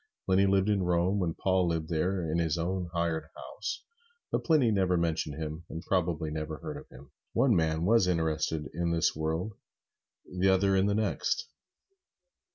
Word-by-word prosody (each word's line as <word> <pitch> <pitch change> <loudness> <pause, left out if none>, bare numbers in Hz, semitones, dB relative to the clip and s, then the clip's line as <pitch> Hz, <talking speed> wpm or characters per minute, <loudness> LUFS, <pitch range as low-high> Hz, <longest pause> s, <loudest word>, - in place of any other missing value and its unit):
Pliny 95 +1 +4
lived 95 0 +3
at 105 -2 +2
Rome 90 +2 +1
when 85 -4 -1
Paul 95 -2 +1
lived 80 -2 -1
there 90 +2 0
in 85 - +1
his 80 -1 0
own 90 +1 -2
hired 85 -2 -1
house, - - -6 0.5
but - - 0
Pliny 150 -9 +4
never 95 -3 +2
mentioned 80 -3 -1
him, 80 +1 -5
and 80 +2 -6
probably 85 -5 0
never 75 0 -4
heard - - -6
of - - -12
him. 65 +2 -14 0.2
One 120 -1 +3
man 80 0 +1
was 110 -2 +4
interested 80 -2 0
in 85 0 -1
this 80 - +2
world, 80 +7 -2 0.7
the 90 +1 +1
other 95 +1 +3
in 95 +1 +3
the 100 - +1
next. 110 - 0
85 Hz, 170 wpm, -29 LUFS, 80-95 Hz, 0.7 s, Pliny